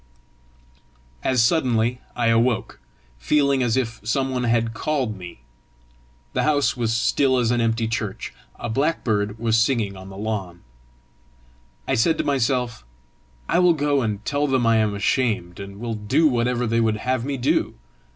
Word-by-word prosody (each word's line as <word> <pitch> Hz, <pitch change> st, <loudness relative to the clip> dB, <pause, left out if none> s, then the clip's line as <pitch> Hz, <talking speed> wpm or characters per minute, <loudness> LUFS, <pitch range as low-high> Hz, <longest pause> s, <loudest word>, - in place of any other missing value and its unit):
As 125 Hz, -3 st, +3 dB
suddenly 120 Hz, -3 st, +1 dB
I 115 Hz, -1 st, +2 dB
woke, 115 Hz, 0 st, 0 dB, 0.4 s
feeling 140 Hz, -, +2 dB
as 120 Hz, -1 st, +1 dB
if 115 Hz, -3 st, -2 dB
some 130 Hz, +5 st, 0 dB
one 125 Hz, -1 st, -1 dB
had 115 Hz, -1 st, +1 dB
called 130 Hz, -6 st, -1 dB
me. 90 Hz, -9 st, -10 dB, 0.9 s
The -, -, +1 dB
house 145 Hz, -2 st, +2 dB
was 115 Hz, -3 st, -1 dB
still 130 Hz, +3 st, +2 dB
as 120 Hz, -2 st, +1 dB
an 120 Hz, -1 st, +1 dB
empty 115 Hz, 0 st, 0 dB
church. 110 Hz, -3 st, -4 dB, 0.2 s
A -, -, -6 dB
blackbird 110 Hz, -6 st, 0 dB
was 115 Hz, 0 st, +1 dB
singing 115 Hz, -4 st, +1 dB
on 95 Hz, 0 st, -10 dB
the 95 Hz, -, -10 dB
lawn. 100 Hz, -5 st, -4 dB, 1.3 s
I -, -, 0 dB
said 160 Hz, +8 st, +2 dB
to -, -, 0 dB
myself, 125 Hz, -, 0 dB, 0.6 s
"I -, -, +2 dB
will 180 Hz, -1 st, +5 dB
go 145 Hz, -2 st, +1 dB
and 105 Hz, -3 st, -3 dB
tell 145 Hz, +1 st, 0 dB
them 130 Hz, -3 st, +1 dB
I 115 Hz, 0 st, +4 dB
am 105 Hz, -2 st, +1 dB
ashamed, 100 Hz, -4 st, 0 dB
and 100 Hz, 0 st, -8 dB
will 115 Hz, 0 st, -3 dB
do 110 Hz, +10 st, +2 dB
whatever 125 Hz, -2 st, 0 dB
they 115 Hz, 0 st, +1 dB
would 110 Hz, -1 st, +1 dB
have 125 Hz, +2 st, -1 dB
me 140 Hz, +1 st, -3 dB
do!" 125 Hz, +2 st, 0 dB
115 Hz, 160 wpm, -23 LUFS, 110-130 Hz, 1.3 s, will